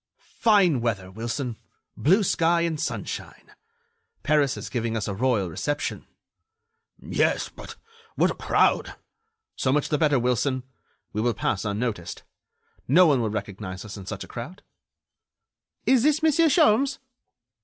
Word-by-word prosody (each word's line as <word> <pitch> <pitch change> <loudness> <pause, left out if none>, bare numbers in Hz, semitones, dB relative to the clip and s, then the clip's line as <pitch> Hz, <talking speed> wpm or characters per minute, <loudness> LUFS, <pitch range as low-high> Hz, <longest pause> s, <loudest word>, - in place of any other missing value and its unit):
"Fine 195 - +4
weather, 100 -6 -2
Wilson.... 115 +3 -4 0.4
Blue 190 +9 +3
sky 170 -2 +2
and 165 -2 -1
sunshine! - - -5 0.7
Paris 145 -3 +2
is - - -6
giving 115 -2 -2
us 105 - -3
a 100 - -2
royal 110 -2 +1
reception." 145 - -3 0.9
"Yes, - - 0
but - - -11 0.4
what - - +3
a - - -3
crowd!" - - +1 0.6
"So 130 - 0
much 145 +1 +1
the 150 - 0
better, 150 -3 +3
Wilson, 125 +2 0 0.5
we 105 - -1
will 120 -1 +1
pass 95 0 -1
unnoticed. 105 -4 -3 0.6
No 175 +8 +6
one 140 -6 +3
will 110 - 0
recognize 100 -2 -6
us 105 - -8
in 100 -3 -10
such - - -5
a - - -11
crowd." 160 +11 -8 1.2
"Is 260 -2 +4
this 305 +4 +2
Monsieur 320 +1 +4
Sholmes?" 275 -3 +3
130 Hz, 140 wpm, -25 LUFS, 110-170 Hz, 1.2 s, No